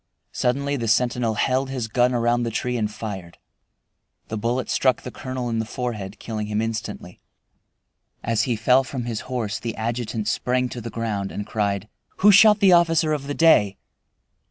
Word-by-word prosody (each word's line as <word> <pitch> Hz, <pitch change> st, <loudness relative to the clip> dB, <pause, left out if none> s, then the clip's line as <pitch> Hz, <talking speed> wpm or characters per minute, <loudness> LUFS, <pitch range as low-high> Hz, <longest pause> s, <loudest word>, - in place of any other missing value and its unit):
Suddenly 140 Hz, +3 st, 0 dB
the 115 Hz, -2 st, -3 dB
sentinel 120 Hz, 0 st, +1 dB
held 130 Hz, +4 st, 0 dB
his 130 Hz, -4 st, -3 dB
gun 120 Hz, +3 st, +2 dB
around 120 Hz, 0 st, +1 dB
the 120 Hz, -, -1 dB
tree 125 Hz, +2 st, -2 dB
and 105 Hz, -3 st, -1 dB
fired. 95 Hz, -6 st, -7 dB, 0.9 s
The 110 Hz, -, -3 dB
bullet 120 Hz, +4 st, -1 dB
struck 130 Hz, -2 st, +1 dB
the 125 Hz, -, -6 dB
colonel 130 Hz, -1 st, -5 dB
in 115 Hz, -1 st, -1 dB
the -, -, 0 dB
forehead, 110 Hz, -4 st, -5 dB
killing 110 Hz, -2 st, -5 dB
him 105 Hz, 0 st, -1 dB
instantly. 115 Hz, 0 st, -5 dB, 1.0 s
As 115 Hz, -1 st, +1 dB
he 120 Hz, -, +1 dB
fell 125 Hz, +4 st, +3 dB
from 125 Hz, -1 st, -5 dB
his 115 Hz, -2 st, -3 dB
horse 115 Hz, -5 st, -2 dB
the 115 Hz, -1 st, -4 dB
adjutant 115 Hz, -1 st, -3 dB
sprang 125 Hz, +3 st, 0 dB
to 120 Hz, -, -7 dB
the 115 Hz, -, -6 dB
ground 110 Hz, -4 st, -3 dB
and 105 Hz, -, -5 dB
cried, 100 Hz, -2 st, -2 dB, 0.3 s
"Who 205 Hz, +2 st, +6 dB
shot 210 Hz, +1 st, +7 dB
the 190 Hz, -2 st, +6 dB
officer 165 Hz, -2 st, +3 dB
of 140 Hz, -2 st, -3 dB
the 145 Hz, -, -3 dB
day?" 105 Hz, -12 st, +4 dB
120 Hz, 180 wpm, -23 LUFS, 110-130 Hz, 1.0 s, shot